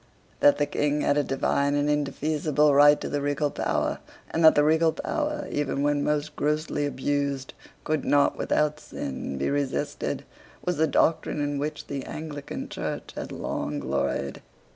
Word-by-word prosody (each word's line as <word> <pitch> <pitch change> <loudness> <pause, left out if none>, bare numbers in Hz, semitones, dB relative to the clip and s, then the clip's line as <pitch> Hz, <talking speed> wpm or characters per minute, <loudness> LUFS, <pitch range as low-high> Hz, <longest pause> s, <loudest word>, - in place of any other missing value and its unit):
That 145 - +6
the 145 - +2
King 145 0 0
had 145 - +2
a 145 - +2
divine 140 +1 +1
and 145 0 +1
indefeasible 150 0 +1
right 145 +1 +7
to - - -3
the 145 - -2
regal 145 +1 0
power, - - -1 0.3
and 165 - 0
that 160 - +8
the 145 - +5
regal 160 +1 +3
power, 300 -1 -2
even 145 -1 -1
when 145 0 +2
most 150 0 -1
grossly 150 0 0
abused, 140 -1 -2 0.3
could 155 -2 -1
not 145 -1 +3
without 150 0 0
sin, 70 - -5
be 70 - 0
resisted, 140 -2 -2 0.4
was 180 -3 0
the 160 +1 +3
doctrine 155 +1 +1
in 145 -1 -1
which 150 +2 -4
the 140 -2 -4
Anglican 150 -2 -6
Church - - -5
had - - -5
long 75 0 -3
gloried. 70 -1 -2
145 Hz, 165 wpm, -26 LUFS, 140-150 Hz, 0.4 s, that